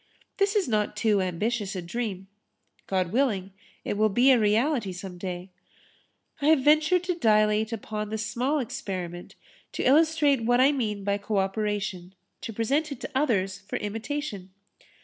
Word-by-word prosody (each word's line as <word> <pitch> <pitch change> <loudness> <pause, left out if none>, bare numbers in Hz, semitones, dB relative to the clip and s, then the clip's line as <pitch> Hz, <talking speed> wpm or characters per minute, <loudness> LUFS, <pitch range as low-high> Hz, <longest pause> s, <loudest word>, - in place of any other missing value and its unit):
This 400 +1 +1
is 405 -7 +2
not 210 -3 0
too 210 -1 +2
ambitious 200 +3 -2
a 185 - -3
dream. 195 0 -4 0.6
God 185 -3 0
willing, 210 -6 0 0.3
it - - -2
will 215 +1 +3
be 245 +7 +5
a 250 - +5
reality 225 +1 +1
some 180 0 -8
day. 180 0 -6 0.9
I 285 - +1
have 310 -4 +5
ventured 310 +5 +4
to 360 0 0
dilate 215 -6 +2
upon 215 -1 -4
the 220 - -3
small 245 +7 -1
experiment 180 - -5 0.4
to - - -2
illustrate 295 -2 +4
what 245 +2 +3
I 265 +3 +6
mean 215 -8 -2
by 200 0 0
co 205 +1 -2
operation 195 -2 -2 0.3
to 230 - -5
present 275 +8 0
it 280 - -6
to - - -6
others 195 -9 0
for 200 - -7
imitation. 220 -1 -4
215 Hz, 160 wpm, -26 LUFS, 195-270 Hz, 0.9 s, I